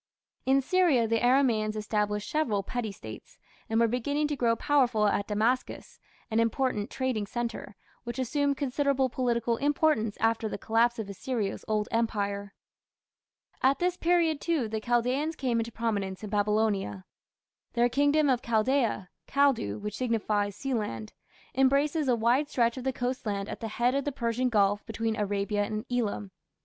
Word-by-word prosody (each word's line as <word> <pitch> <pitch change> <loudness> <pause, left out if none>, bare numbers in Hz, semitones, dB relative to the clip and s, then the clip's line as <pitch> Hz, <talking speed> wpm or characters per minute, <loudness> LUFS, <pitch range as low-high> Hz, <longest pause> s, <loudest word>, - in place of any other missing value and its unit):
In 270 +1 +4
Syria 310 -8 +3
the 225 0 +1
Aramaeans 240 -4 +3
established 210 -1 -1
several 245 -11 0
petty 230 0 -3
States, 110 - -11 0.3
and 225 0 +2
were 230 - +4
beginning 285 +6 0
to 295 - -1
grow 235 -3 +2
powerful 245 -4 +2
at 205 -1 +1
Damascus, 225 +5 -1 0.3
an 220 - +2
important 230 -2 0
trading 255 -6 -2
centre, 235 -2 -4 0.3
which 240 +1 -6
assumed 280 +2 0
considerable 275 -1 +1
political 235 -2 0
importance 285 -6 +1
after 225 0 +1
the - - -4
collapse 235 +2 +2
of 220 -3 -4
Assyria's 205 +1 -3
Old 215 -1 0
Empire. 205 -3 -1 1.1
At 265 +1 +4
this 360 +2 0
period, 335 -4 +2
too, 320 -9 0
the 220 0 -3
Chaldaeans 250 +7 0
came 250 -5 0
into 230 +1 -3
prominence 205 -4 -2
in 210 - -6
Babylonia. 205 - 0 0.7
Their 240 0 +3
kingdom 285 +4 +3
of 255 -3 +2
Chaldaea 230 -4 +1 0.2
(Kaldu, 270 - +2
which 210 0 -5
signifies 210 -4 0
Sealand) 210 - -3 0.4
embraces 280 +3 +2
a 250 - +4
wide 240 +6 +2
stretch 235 -3 +1
of 260 -1 -7
the 265 - +2
coast 250 -1 -3
land 200 -1 -2
at - - -6
the 225 - -4
head 240 +3 +1
of 275 0 -1
the 290 - 0
Persian 250 -1 -1
Gulf 205 -2 +2
between 225 0 -2
Arabia 205 0 -1
and 215 +2 -4
Elam. 215 -5 -1
235 Hz, 160 wpm, -28 LUFS, 215-265 Hz, 1.1 s, In